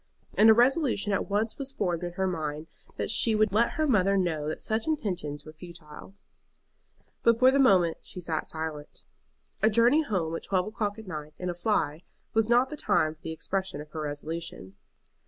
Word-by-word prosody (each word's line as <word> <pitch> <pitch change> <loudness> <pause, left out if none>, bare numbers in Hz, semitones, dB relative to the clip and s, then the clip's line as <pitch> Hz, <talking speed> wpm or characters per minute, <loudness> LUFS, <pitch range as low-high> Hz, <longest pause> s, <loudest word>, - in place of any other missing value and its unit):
And 220 - +6
a 220 - +8
resolution 245 -4 +2
at 195 - -1
once 215 +5 -1
was 275 -1 -3
formed 180 -7 -2
in 175 -1 -4
her 190 +2 -1
mind 155 -4 -3 0.3
that - - -1
she 225 -3 +3
would 215 -2 +2
let 230 +3 +2
her 310 - 0
mother 200 -7 +3
know 160 -5 -1
that 155 - -4
such 220 +4 -2
intentions 180 - -3
were 155 - -11
futile. 165 +1 -12 1.1
But 230 -1 +4
for 255 +2 +6
the 275 - +2
moment 185 -11 +4
she - - -9
sat 165 -3 -3
silent. 155 -2 -6 0.6
A 220 - +5
journey 235 +7 +4
home 180 - -2
at - - -5
twelve 185 -2 0
o'clock 215 -1 -3
at 220 - -10
night 155 -4 -7
in 180 -1 -3
a - - -5
fly 170 -4 0 0.3
was 225 0 +2
not 245 +2 +3
the 300 - -5
time 200 - +1
for 160 - -28
the 165 - -5
expression 190 0 -2
of 150 0 -10
her 160 - -5
resolution. 150 - -5
190 Hz, 195 wpm, -28 LUFS, 160-220 Hz, 1.1 s, a